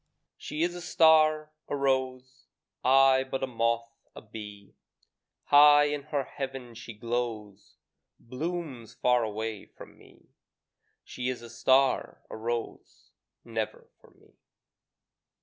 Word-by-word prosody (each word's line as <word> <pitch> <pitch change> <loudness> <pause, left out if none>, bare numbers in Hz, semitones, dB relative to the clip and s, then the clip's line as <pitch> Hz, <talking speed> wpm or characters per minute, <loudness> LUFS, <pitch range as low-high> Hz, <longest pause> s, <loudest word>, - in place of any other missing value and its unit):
She 150 +2 -4
is 175 0 0
a 175 - -7
star, 155 -2 +4 0.2
a - - -2
rose, 130 -2 -2 0.4
I 130 0 +5
but 135 0 -4
a - - +3
moth, 115 -1 -1 0.2
a - - -9
bee; 105 -2 -10 0.7
High 145 0 +7
in 145 -1 -4
her 145 -2 -1
heaven 135 -3 -7
she 115 0 -9
glows, 110 -3 -5 0.4
Blooms 135 -2 -6
far 125 -1 +2
away 110 -1 -4
from - - -15
me: - - -21 0.7
She 125 0 -4
is 125 -2 -5
a 115 - -11
star, 130 +2 +2
a - - -6
rose, 115 +1 -6 0.3
Never 110 -2 -5
for - - -20
me. - - -25
130 Hz, 125 wpm, -28 LUFS, 115-140 Hz, 0.7 s, High